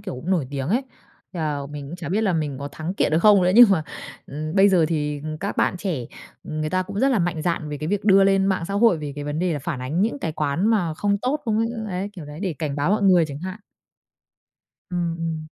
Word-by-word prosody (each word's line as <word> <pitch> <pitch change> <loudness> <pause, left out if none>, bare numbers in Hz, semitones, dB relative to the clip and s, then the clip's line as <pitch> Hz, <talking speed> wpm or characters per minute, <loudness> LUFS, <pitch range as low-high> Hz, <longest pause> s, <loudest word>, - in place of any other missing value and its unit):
kiểu, - - -6
cũng 155 +9 -5
nổi 165 -9 +1
tiếng 140 -1 -3
ấy, 240 +8 +2 0.5
thế 175 - -5
là 145 -3 -2
mình 145 -1 -7
cũng 175 - -7
chả 170 -4 -6
biết 205 +5 +1
là 195 -4 +2
mình 150 -4 -2
có 140 - -5
thắng 165 +4 -5
kiện 155 - +1
được 160 - +4
không 200 +1 +6
nữa. 180 - +3
Nhưng 235 -2 +9
mà, 160 -5 +2 0.4
ừm, 155 +3 -5
bây 195 +1 +6
giờ 180 -5 +4
thì, 150 -3 -2
ừm, 155 0 -5
các 200 +3 -4
bạn 185 - +1
trẻ, 170 - -3 0.4
ừm, 155 0 -3
người 155 - -2
ta 185 0 +1
cũng 200 +2 -5
rất 270 - +4
là 255 - +2
mạnh 170 -3 -1
dạn 165 -2 -1
về 150 - -4
cái 155 - -4
việc 205 0 -1
đưa 195 -2 +6
lên 195 0 +3
mạng 190 -3 0
xã 200 - -3
hội, 205 -5 +4
về 145 -2 -5
cái 145 0 -6
vấn 145 +1 -3
đề 180 -1 0
là 150 - -2
phản 140 -2 -4
ánh 145 +7 -2
những 230 +6 0
cái 165 - -3
quán 155 +6 0
mà 185 -8 +1
không 200 +3 0
tốt 260 +7 -1
không 220 -1 0
ấy, 230 - +1 0.2
đấy, 190 +2 -3
kiểu 175 -7 -9
đấy, 150 +3 -9
để 190 -4 -1
cảnh 150 -3 -3
báo 145 +6 +1
mọi 210 0 +2
người 180 -4 +5
chẳng 140 -1 -7
hạn. 185 +5 -6 1.3
Ừm, 170 -2 -1
ừm. 165 -1 -3
170 Hz, 275 wpm, -23 LUFS, 150-195 Hz, 1.3 s, Nhưng